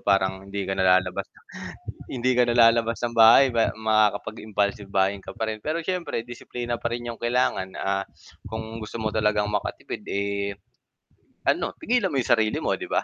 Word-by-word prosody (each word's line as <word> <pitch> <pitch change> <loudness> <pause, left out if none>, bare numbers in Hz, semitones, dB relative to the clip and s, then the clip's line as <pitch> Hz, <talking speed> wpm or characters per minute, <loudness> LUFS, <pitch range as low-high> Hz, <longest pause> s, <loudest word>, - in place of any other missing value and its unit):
Parang 95 -1 +1
hindi 100 0 -3
ka 95 - -2
na 95 -1 +1
lalabas 95 -1 -2
ng - - -24 0.7
hindi 125 +1 +1
ka 125 - +4
nalalabas 115 -1 +4
ng 120 - 0
bahay 115 +4 +8
pe 115 -1 +2
makakapag-impulsive 105 -1 0
buying 100 +1 +1
ka - - -10
pa 115 -1 -2
rin. 110 - -6
Pero, 160 +5 -2
siyempre, 180 -10 -2
disiplina 120 0 -5
pa - - -2
rin 120 - -7
'yong 115 - -7
kailangan, 120 -6 0
ah, 95 0 -1 0.4
kung 110 0 -6
gusto 110 0 -8
mo 110 -1 -1
talagang 105 -1 +1
makatipid, 105 - -4
eh, 100 0 -2 0.9
ano, - - 0
pigilan 240 -4 +1
mo 145 - -4
'yong - - -2
sarili 110 -2 +3
mo, - - +1
'di - - -6
ba? - - 0
110 Hz, 180 wpm, -25 LUFS, 100-120 Hz, 0.9 s, bahay